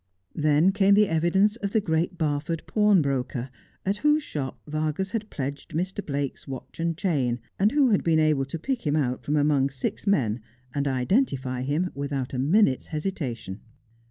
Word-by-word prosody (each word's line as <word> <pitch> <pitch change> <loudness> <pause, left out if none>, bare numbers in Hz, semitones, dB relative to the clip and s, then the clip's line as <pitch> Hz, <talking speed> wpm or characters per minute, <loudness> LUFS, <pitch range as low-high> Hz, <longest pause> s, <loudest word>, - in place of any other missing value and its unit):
Then 155 +4 +3
came 200 0 +4
the 210 0 +5
evidence 180 +6 +2
of 200 -3 -3
the 220 - +2
Great 170 -2 -1
Barford 155 +1 -1
pawnbroker, 140 - +1 0.3
at 195 +2 0
whose 300 +4 +3
shop 135 - -5
Vargas 155 +5 -2
had 215 -1 -3
pledged 140 +1 -5
Mr. 190 +4 -2
Blake's 140 -2 -4
watch 135 +2 -8
and 165 -1 -1
chain, 135 - 0 0.2
and 205 +3 +4
who 275 -4 +4
had 200 - +2
been 165 -1 +3
able 155 -3 +3
to 140 +5 -5
pick 255 - -2
him 145 - +2
out 130 -5 0
from 150 - -1
among 145 -2 +3
six 135 +9 -4
men, 125 - +2 0.3
and 140 0 -1
identify 130 - 0
him, 150 +7 -1
without 140 -2 -3
a 125 - -2
minute's 145 0 +3
hesitation. 145 - -4
155 Hz, 170 wpm, -26 LUFS, 135-195 Hz, 0.3 s, the